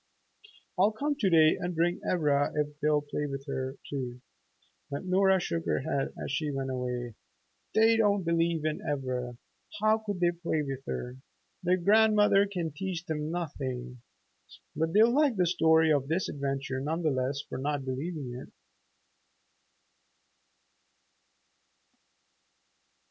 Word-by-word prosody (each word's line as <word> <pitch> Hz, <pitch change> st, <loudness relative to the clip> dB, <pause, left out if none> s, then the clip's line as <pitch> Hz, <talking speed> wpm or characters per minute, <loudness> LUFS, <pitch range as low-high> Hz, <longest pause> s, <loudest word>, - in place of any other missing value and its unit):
"I'll 200 Hz, +3 st, +5 dB
come 290 Hz, +7 st, -1 dB
to 200 Hz, -, +2 dB
day 160 Hz, -2 st, +5 dB
and 180 Hz, 0 st, -3 dB
bring 170 Hz, +2 st, +1 dB
Ivra 145 Hz, -5 st, +1 dB
if 150 Hz, 0 st, -2 dB
they'll 150 Hz, -1 st, +2 dB
play 145 Hz, 0 st, -3 dB
with 135 Hz, -1 st, -6 dB
her, 130 Hz, -2 st, -3 dB
too!" 125 Hz, -3 st, -5 dB, 0.7 s
But 140 Hz, +6 st, -5 dB
Nora 190 Hz, +1 st, +4 dB
shook 85 Hz, -, -3 dB
her 75 Hz, -, +1 dB
head 135 Hz, -1 st, -1 dB
as -, -, -5 dB
she 150 Hz, +1 st, -1 dB
went 135 Hz, -1 st, -3 dB
away. 125 Hz, -2 st, -3 dB, 0.6 s
"They 225 Hz, +1 st, +5 dB
don't 205 Hz, -3 st, +2 dB
believe 165 Hz, -1 st, +1 dB
in 155 Hz, -1 st, -1 dB
Ivra. 130 Hz, -4 st, -3 dB, 0.4 s
How 215 Hz, +1 st, +3 dB
could 205 Hz, -4 st, -4 dB
they 175 Hz, -1 st, +3 dB
play 170 Hz, -3 st, -2 dB
with 135 Hz, -1 st, -5 dB
her? 125 Hz, +1 st, -4 dB, 0.4 s
Their 180 Hz, +1 st, +2 dB
grandmother 210 Hz, +1 st, +4 dB
can 175 Hz, -5 st, -3 dB
teach 175 Hz, +2 st, -4 dB
them 150 Hz, -1 st, -3 dB
nothing. 130 Hz, -7 st, -4 dB, 0.7 s
But 160 Hz, +1 st, -1 dB
they'll 225 Hz, +3 st, +5 dB
like 285 Hz, -3 st, +3 dB
the 180 Hz, -2 st, +2 dB
story 160 Hz, -2 st, +4 dB
of 140 Hz, -2 st, 0 dB
this 170 Hz, +5 st, 0 dB
adventure 135 Hz, -2 st, -3 dB
none 160 Hz, +5 st, -2 dB
the 155 Hz, -, +2 dB
less 135 Hz, +2 st, -1 dB
for -, -, -5 dB
not 145 Hz, 0 st, -2 dB
believing 135 Hz, 0 st, -4 dB
it." 125 Hz, -, -8 dB
155 Hz, 140 wpm, -29 LUFS, 135-180 Hz, 0.7 s, I'll